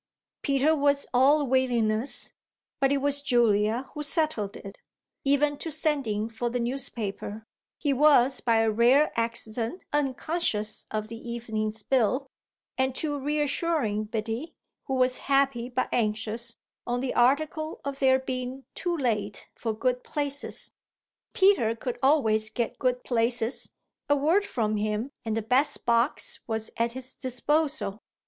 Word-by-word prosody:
Peter 280 +3 +3
was 285 -1 +2
all 280 +4 +5
willingness, 245 -2 +1 0.5
but 270 0 +3
it 280 - +3
was 285 +1 0
Julia 235 -3 +2
who 300 - -5
settled 295 - -1
it, 195 0 -10 0.4
even 285 +1 +2
to 330 - -4
sending 275 -9 0
for 230 +1 -3
the 245 +1 -2
newspaper 225 -4 -4 0.3
he 285 -2 0
was 275 -2 +5
by 230 -2 +2
a 225 0 +3
rare 245 +7 +4
accident 230 +5 -2
unconscious 270 -6 -1
of 215 0 -3
the 225 +1 -8
evening's 220 -2 -3
bill 260 +3 +2 0.5
and 260 0 +1
to 290 -2 -1
reassuring 290 -5 0
Biddy, 225 +8 -4 0.3
who 265 - -1
was 255 0 +2
happy 275 -3 +2
but 255 +1 -1
anxious, 225 +1 -1 0.3
on 245 0 0
the 255 0 -2
article 310 +5 +1
of 280 -1 -4
their 260 -1 +5
being 260 0 -5
too 345 -1 -2
late 210 -7 -2
for 225 - -3
good 250 +3 -1
places. 285 -1 -3 0.6
Peter 380 - +4
could 245 +1 -4
always 225 -6 +4
get 235 -1 -3
good 250 -1 0
places: 235 0 0 0.4
a 290 - +5
word 325 +9 +2
from 215 -3 0
him 215 +5 -1
and 220 0 -1
the 225 - -1
best 255 +6 +1
box 235 +3 +1
was 220 -1 -2
at 235 0 0
his 260 0 -5
disposal. 275 -3 -1
250 Hz, 140 wpm, -27 LUFS, 225-280 Hz, 0.6 s, all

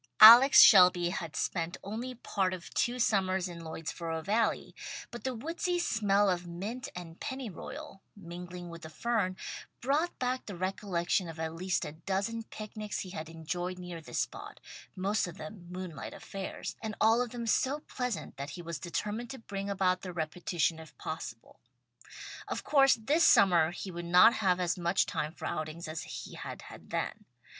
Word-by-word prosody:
Alex 240 +5 +11
Shelby 180 -3 +7
had 165 -3 -5
spent 170 0 -2
only 235 +6 -5
part 190 -5 -1
of 175 - -11
two 245 +1 +1
summers 190 -5 +2
in 170 -1 -8
Lloydsboro 160 0 -4
Valley, 220 +4 0 0.4
but 240 - -8
the 260 -1 -2
woodsy 335 +8 -2
smell 205 - +2
of 180 -2 0
mint 215 +10 -5
and 170 -2 -8
pennyroyal, 260 - -6
mingling 175 -1 -8
with 170 0 -9
the 160 - -8
fern, 190 +1 -1 0.4
brought 295 +7 0
back 255 0 -2
the 200 - -5
recollection 185 -1 -1
of 160 0 -9
at 160 0 -2
least 185 +2 -1
a 150 - -5
dozen 195 +8 -2
picnics 215 -1 -6
he 185 - -7
had 155 -3 -6
enjoyed 175 +3 -4
near 180 -2 -7
this 160 - -6
spot, - - -4 0.4
most 195 +2 0
of 175 +1 -9
them 205 -5 -9
moonlight 180 -5 -6
affairs, 195 -1 -6
and 215 -2 -4
all 225 +2 +5
of 245 - -1
them 235 0 -5
so 270 +5 +1
pleasant 250 -6 -4
that 140 +1 -5
he 175 - -7
was 170 -2 -5
determined 210 +6 -3
to 270 - -6
bring 200 -4 -5
about 185 -2 +1
their 185 - -6
repetition 165 0 -1
if 160 -1 -13
possible. 140 -8 -7 0.9
Of - - -3
course 275 -2 +5
this 285 +9 +2
summer 175 -5 +6
he 185 +2 -6
would 175 0 -6
not 180 +7 +7
have 185 -4 +2
as 180 0 0
much 175 +2 +2
time 150 - -2
for 160 - -9
outings 155 +2 -4
as 155 0 -4 0.2
he - - -11
had - - -7
had - - -12
then. - - -3
185 Hz, 175 wpm, -31 LUFS, 170-225 Hz, 0.9 s, Alex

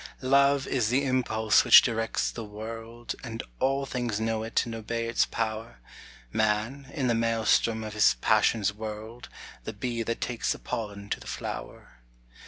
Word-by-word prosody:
Love 140 +1 +4
is 120 -5 0
the 135 +4 +2
impulse 110 -5 +2
which - - +9
directs 115 -2 -1
the 115 - -6
world, 115 +2 -7
And 115 -2 -5 0.2
all 135 +1 +1
things 120 -5 -2
know 110 0 -1
it 110 +3 0
and 115 - -6
obey 115 +1 -3
its 115 - +2
power. 110 - -3 0.6
Man, 110 +6 0
in 135 - -1
the 120 - +3
maelstrom 115 0 +2
of 110 -1 -6
his 105 - +4
passions 100 - +2
whirled; 110 +2 -7 0.3
The - - -5
bee 115 +2 -3
that 115 +1 -2
takes 120 -2 -1
the - - -9
pollen 100 -2 -5
to - - -1
the - - -12
flower. - - -7
115 Hz, 165 wpm, -28 LUFS, 110-120 Hz, 0.6 s, which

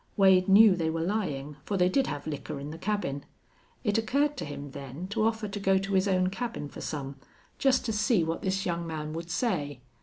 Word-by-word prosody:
Wade 190 -2 +5
knew 200 0 +8
they 165 -2 0
were 165 0 -1
lying, 150 -8 -2
for 200 - -2
they 180 -1 +4
did 260 +8 +2
have 145 - -4
liquor 150 -1 -5
in 145 +2 -6
the 160 - -8
cabin. 190 -10 -2 0.6
It 210 -2 +2
occurred 285 +6 +1
to - - -4
him, 145 -1 -7
then, 140 +5 -7
to 205 - 0
offer 220 -1 0
to 205 +1 -5
go 195 -1 +3
to 195 +1 -2
his 190 +1 +3
own 185 -1 +2
cabin 230 -8 -4
for - - -9
some, 140 -2 -5 0.4
just 260 -2 +3
to 225 - -1
see 215 -3 +2
what 165 +1 -2
this 190 0 -1
young 170 -1 -2
man 155 -1 -4
would 165 +1 -6
say. 165 - -1
185 Hz, 220 wpm, -28 LUFS, 150-210 Hz, 0.6 s, knew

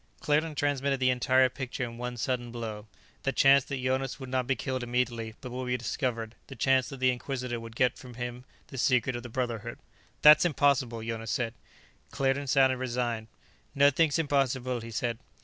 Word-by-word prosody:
Claerten 150 +1 +1
transmitted 140 -1 0
the 130 -1 +3
entire 130 +1 +4
picture 130 0 -5
in 115 -1 -5
one 125 0 -4
sudden 120 0 -2
blow: 110 -3 -6 0.3
the 135 - 0
chance 135 0 +5
that 135 -2 -4
Jonas 130 +1 -1
would 130 -1 -7
not 130 -1 -1
be 135 - +2
killed 130 +3 -3
immediately, 120 -2 -2
but 125 - -7
would 125 +1 -4
be 125 0 0
discovered; 115 -2 -3
the 135 - -9
chance 130 +1 +2
that 135 - -8
the 130 0 +4
Inquisitor 125 -1 -4
would 115 -1 -10
get 125 0 +1
from 125 -2 -11
him 120 0 -5 0.3
the 135 - -7
secret 125 0 +2
of 120 - -4
the 120 - -9
Brotherhood 120 -3 -3 0.5
"That's 150 0 +9
impossible," 135 -8 +1
Jonas 115 -1 -4
said. 115 0 -1 0.6
Claerten 135 +1 0
sounded 130 -1 +4
resigned. 120 -3 -2 0.5
"Nothing's 145 +2 +4
impossible," 135 -5 0
he 115 0 -8
said. 115 0 -2
125 Hz, 185 wpm, -29 LUFS, 120-135 Hz, 0.6 s, That's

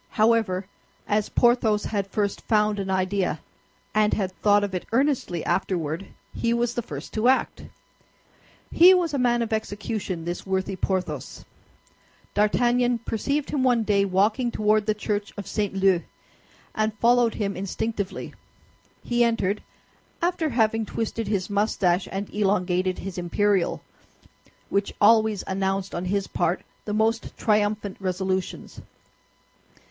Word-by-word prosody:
However, 215 -4 +2 0.4
as 210 0 +1
Porthos 235 -3 +3
had 200 -3 -2
first 200 0 -2
found 210 -2 +1
an 195 -1 -3
idea, 185 -3 0 0.5
and 215 0 +3
had 190 -3 -1
thought 205 +2 +3
of 200 -2 -3
it 180 - -4
earnestly 250 - 0
afterward, 170 -1 -1 0.3
he 235 0 0
was 240 0 0
the 240 - -2
first 145 -7 -8
to 220 +2 +1
act. 260 +1 +1 1.1
He 360 +3 +8
was 345 -4 0
a 280 - 0
man 240 -1 +2
of 225 - -3
execution, 205 -5 -3
this 175 +1 -4
worthy 190 0 -2
Porthos. 180 -7 -3 0.9
D'Artagnan 240 +4 +2
perceived 280 +6 -1
him 285 - 0
one 245 -3 +3
day 205 -2 +2
walking 205 +6 +1
toward 215 -1 +1
the 215 - +2
church 205 -1 -3
of 205 - -5
St. 205 -3 -2
Leu, 190 -2 +3 0.7
and 215 0 -1
followed 240 +1 +3
him 200 -2 -2
instinctively. 200 +1 -4 0.7
He 240 0 +2
entered, 215 -3 0 0.6
after 340 -2 0
having 225 -3 +1
twisted 225 0 -3
his 200 -3 -1
mustache 200 -3 +1
and 195 +1 -3
elongated 185 -3 +1
his 185 -1 -6
imperial, 190 +1 +1 0.8
which 200 0 -1
always 220 -1 +4
announced 195 0 -2
on 175 - -3
his 200 +1 0
part 170 +3 -1 0.2
the 210 - -3
most 225 +2 0
triumphant 210 -2 0
resolutions. 190 0 -3
205 Hz, 135 wpm, -25 LUFS, 190-225 Hz, 1.1 s, He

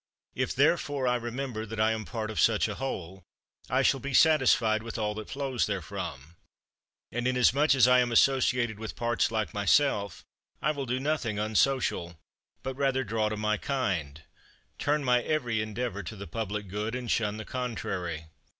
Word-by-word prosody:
If - - -2
therefore 140 -3 +2
I 125 - +3
remember 120 -1 -4
that 110 0 -6
I 110 +1 +3
am 110 -1 -3
part 110 -2 -4
of 110 - -4
such 110 -2 +3
a 105 - -3
whole, 95 -8 -5 0.5
I - - +2
shall 135 - +3
be 135 +1 -3
satisfied 125 -9 +4
with 115 +1 -6
all 105 -1 -1
that 110 0 -7
flows 135 -3 -1
therefrom. 85 -6 -5 0.7
And, 120 +1 -1
inasmuch 130 +4 +4
as 125 -2 +6
I 125 0 +6
am 120 -1 +1
associated 125 -3 +3
with 110 0 -6
parts 120 0 +1
like 110 -6 -2
myself, 100 -1 +1 0.3
I 150 - +1
will 140 -3 -4
do 125 +2 -1
nothing 135 -7 -1
unsocial; 105 -5 +1 0.5
but 130 0 -3
rather 135 -1 0
draw 110 -1 0
to 110 - -4
my 110 0 0
kind, 85 - -2 0.6
turn 145 0 +1
my 125 -2 +3
every 120 -7 0
endeavour 110 -1 -3
to 95 +3 -7
the 100 -1 -8
public 105 -2 -4
good, 105 +5 -3
and 125 -2 -3
shun 105 -1 0
the 110 - -6
contrary. 90 -10 -4
115 Hz, 175 wpm, -28 LUFS, 105-130 Hz, 0.7 s, as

